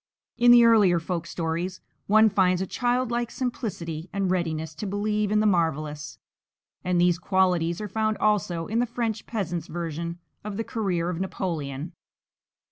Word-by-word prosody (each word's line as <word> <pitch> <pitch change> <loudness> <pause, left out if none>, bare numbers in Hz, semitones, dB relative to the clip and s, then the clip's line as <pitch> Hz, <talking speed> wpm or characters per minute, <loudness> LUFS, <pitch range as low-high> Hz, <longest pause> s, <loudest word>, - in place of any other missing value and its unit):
In 240 0 +4
the 240 -1 +8
earlier 205 -7 +5
folk 170 0 -4
stories 170 +2 -3 0.3
one 215 +2 +6
finds 185 -3 +2
a 190 - -1
childlike 240 +1 0
simplicity 180 -11 -4
and 195 -2 -1
readiness 160 -3 -2
to 210 - -4
believe 210 +1 -1
in 210 0 +3
the - - +1
marvellous; 155 -6 0 0.7
and 180 -1 +1
these 175 -1 +3
qualities 180 -3 +1
are 210 - -4
found 215 +1 -1
also 185 -6 +1
in 225 +5 -1
the 245 - +1
French 225 -2 -3
peasant's 175 -7 -3
version 170 0 -4 0.3
of 205 -1 -5
the 225 - -1
career 185 -7 -1
of 175 0 -4
Napoleon. 160 -5 -4
185 Hz, 155 wpm, -26 LUFS, 170-215 Hz, 0.7 s, the